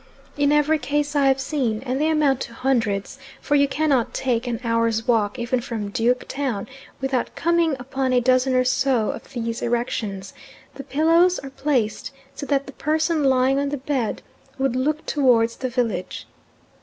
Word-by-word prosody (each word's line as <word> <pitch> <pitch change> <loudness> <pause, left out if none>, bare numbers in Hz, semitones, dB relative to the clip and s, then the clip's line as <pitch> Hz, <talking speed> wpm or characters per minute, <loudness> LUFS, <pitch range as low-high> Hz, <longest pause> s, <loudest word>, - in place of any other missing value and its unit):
In 285 0 +2
every 295 +1 +3
case 290 +1 -1
I 280 -1 +4
have 270 0 +3
seen 260 -5 -1
and 260 +2 -1
they 310 - +2
amount 295 -4 +2
to 235 - -6
hundreds, 230 -2 -1 0.2
for - - -2
you 280 -1 +4
cannot 280 -4 0
take 245 -2 -1
an 235 -2 -2
hour's 230 -1 0
walk 225 -1 +1
even 240 +1 -1
from 220 -4 -5
Duke 245 +2 0
Town 265 -7 -3 0.3
without 265 -2 -2
coming 335 -3 +2
upon 265 +1 -2
a 250 - +4
dozen 255 +1 +2
or 255 - +4
so 255 -3 +1
of - - -10
these 230 -1 -3
erections 220 -5 -2 0.4
the 275 - -8
pillows 330 +6 +3
are 270 - -8
placed 260 -7 -1 0.2
so 280 - -7
that 280 -1 +1
the 275 - -10
person 315 +2 0
lying 265 0 +3
on 280 0 -1
the 290 - -3
bed 260 -4 -2 0.3
would 265 -2 0
look 300 +4 -1
towards 235 -5 +2
the 255 - -3
village. 230 -7 -2
260 Hz, 175 wpm, -22 LUFS, 235-285 Hz, 0.4 s, I